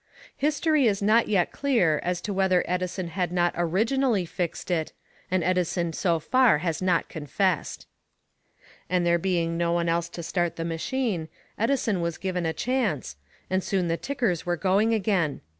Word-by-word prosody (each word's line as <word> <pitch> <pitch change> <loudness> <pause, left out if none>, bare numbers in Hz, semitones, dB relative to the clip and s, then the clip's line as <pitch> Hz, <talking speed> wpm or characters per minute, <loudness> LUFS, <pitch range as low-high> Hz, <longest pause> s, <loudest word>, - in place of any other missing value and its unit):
History 300 -1 +2
is 200 -2 0
not 220 +3 +4
yet 195 -4 +1
clear 225 - +2
as 180 0 -1
to 205 - -3
whether 190 -2 +2
Edison 180 0 -2
had 180 -1 -2
not 175 -1 +1
originally 210 +5 +1
"fixed" 175 +1 -4
it, 160 -3 -1 0.4
and 185 -2 +1
Edison 175 -1 0
so 170 0 +1
far 255 +1 +4
has 165 +1 -2
not 180 -2 +1
confessed. 160 +4 -2 1.0
And 180 0 +1
there 170 0 +3
being 170 -2 0
no 170 0 +1
one 170 0 0
else 170 0 0
to 170 0 -7
start 175 0 -1
the 165 - -4
machine, 170 +1 -2 0.3
Edison 225 -5 0
was 170 -1 -2
given 180 -3 -2
a - - +1
chance, 215 - -1 0.3
and 185 0 0
soon 185 -3 0
the 165 - +1
tickers 235 - -1
were 175 0 -1
going 200 +5 +2
again. 195 -8 0
180 Hz, 165 wpm, -26 LUFS, 170-205 Hz, 1.0 s, not